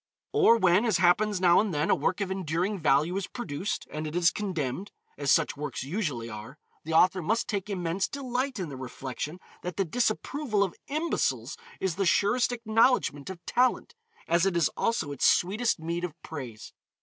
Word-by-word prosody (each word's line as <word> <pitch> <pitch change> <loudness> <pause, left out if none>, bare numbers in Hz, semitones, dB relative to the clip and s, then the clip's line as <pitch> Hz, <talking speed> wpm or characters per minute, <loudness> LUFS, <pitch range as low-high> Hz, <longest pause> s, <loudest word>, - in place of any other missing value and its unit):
Or 230 - +5
when, 185 0 +4
as 220 -7 +2
happens 190 +3 +3
now 175 -1 +5
and 210 -1 +1
then, 150 0 0
a - - +5
work 195 +3 -1
of 195 -1 -2
enduring 185 +2 -1
value 155 +3 +2
is 195 - -3
produced, 205 - -4
and 155 +1 -4
it 155 - -6
is 175 0 +4
condemned, 185 -2 -3 0.3
as 145 -1 0
such 165 -3 +3
works 145 -3 -4
usually 140 - -3
are, 110 +5 -9 0.3
the 160 - -4
author 185 +3 +4
must 220 +8 0
take 200 -1 -3
immense 185 -1 -1
delight 260 -1 -3
in 180 -5 -4
the 135 - -7
reflection 130 +5 -6 0.2
that 180 -1 -5
the 195 - +1
disapproval 225 - 0
of 190 - -2
imbeciles 310 +4 -1 0.2
is 185 -3 -1
the 195 -2 +1
surest 210 +8 +3
acknowledgement 225 - +2
of 175 -3 -9
talent, 255 - +1 0.3
as 170 0 +3
it 180 -3 0
is 170 - +3
also 195 -10 0
its 140 - +2
sweetest 215 +7 +1
mead 170 +2 -3
of 170 -2 -5
praise. 125 -8 -8
180 Hz, 185 wpm, -28 LUFS, 155-215 Hz, 0.3 s, Or